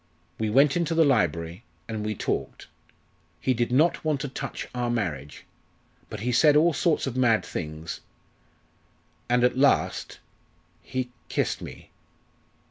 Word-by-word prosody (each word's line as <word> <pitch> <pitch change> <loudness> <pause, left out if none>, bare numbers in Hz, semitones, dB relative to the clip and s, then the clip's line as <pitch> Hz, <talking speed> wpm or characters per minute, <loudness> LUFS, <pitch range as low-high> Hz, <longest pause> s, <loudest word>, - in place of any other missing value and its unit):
We 110 -1 0
went 135 +5 +4
into 170 -1 0
the 165 -1 +5
library, 85 - +1 0.2
and 110 -2 -4
we 105 0 -2
talked. - - -3 0.7
He 130 - +1
did 120 0 -1
not 160 +6 +3
want 155 -3 0
to 145 - -2
touch 135 0 -5
our 125 -1 -1
marriage, 75 - -3 0.6
but 105 - -6
he 125 +3 0
said 145 +5 +5
all 165 +3 +5
sorts 160 +2 +1
of 135 -3 -4
mad 120 -4 +3
things, 80 +1 -5 1.3
and 125 0 +3
at 125 0 +3
last 140 +1 +2 0.6
he 130 -1 -4 0.2
kissed - - -1
me." - - -10
125 Hz, 140 wpm, -26 LUFS, 105-145 Hz, 1.3 s, the